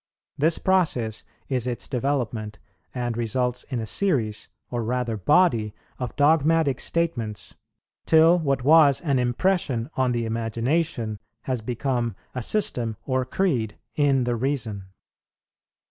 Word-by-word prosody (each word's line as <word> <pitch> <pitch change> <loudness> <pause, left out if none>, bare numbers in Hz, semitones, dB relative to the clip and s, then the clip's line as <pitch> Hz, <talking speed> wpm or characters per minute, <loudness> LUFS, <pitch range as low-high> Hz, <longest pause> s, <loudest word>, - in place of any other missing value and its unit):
This 155 +3 +3
process 140 - +1 0.2
is 125 -2 -1
its 120 -1 -3
development, 120 -5 -2 0.3
and 120 -2 -3
results 125 +2 -1
in 130 -4 -2
a 110 - -3
series, 115 - 0 0.2
or 120 -1 -2
rather 120 0 -1
body, 115 - +2 0.2
of 125 -3 -4
dogmatic 155 -1 +3
statements, 115 - -2 0.5
till 165 +2 +6
what 140 -5 0
was 150 -1 +6
an 140 -6 +1
impression 125 -1 0
on 130 -1 +1
the 120 -1 -1
Imagination 115 +1 -1 0.2
has 130 -3 -2
become 120 -1 -2 0.2
a 125 - -3
system 120 - 0
or 130 -1 0
creed 125 - -1 0.2
in 140 -2 +2
the 120 0 0
Reason. 115 -6 -2
125 Hz, 125 wpm, -24 LUFS, 115-145 Hz, 0.5 s, till